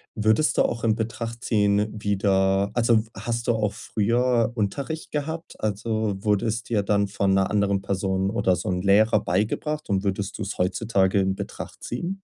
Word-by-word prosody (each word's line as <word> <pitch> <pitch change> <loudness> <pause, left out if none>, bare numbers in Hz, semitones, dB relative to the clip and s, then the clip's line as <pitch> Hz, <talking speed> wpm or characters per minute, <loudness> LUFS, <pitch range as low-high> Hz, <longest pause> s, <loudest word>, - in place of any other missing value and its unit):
würdest 110 +7 +2
du - - +5
auch 115 - -2
in 110 -2 +3
Betracht 115 +1 -4
ziehen, 105 -1 +2
wieder 100 -1 +1
also 115 -2 +3 0.2
hast 115 0 -3
du 120 - +4
auch 105 -2 0
früher 115 +2 +1
Unterricht 140 +9 -3
gehabt? 160 +3 -4
Also 110 0 -1
wurde 105 -1 +1
es 115 +1 -2
dir 110 -4 0
dann 100 0 +1
von 100 0 0
'ner 95 0 +2
anderen 100 -2 +1
Person 95 0 -1
oder 95 -4 +1
so 110 - -5
'n 90 -1 -1
Lehrer 105 +2 +4
beigebracht 115 - -1
und 95 0 +1
würdest 100 -1 -2
du's - - -4
heutzutage 95 +1 +1
in 95 0 +1
Betracht 100 - -8
ziehen? 175 +10 -4
105 Hz, 170 wpm, -24 LUFS, 100-115 Hz, 0.2 s, du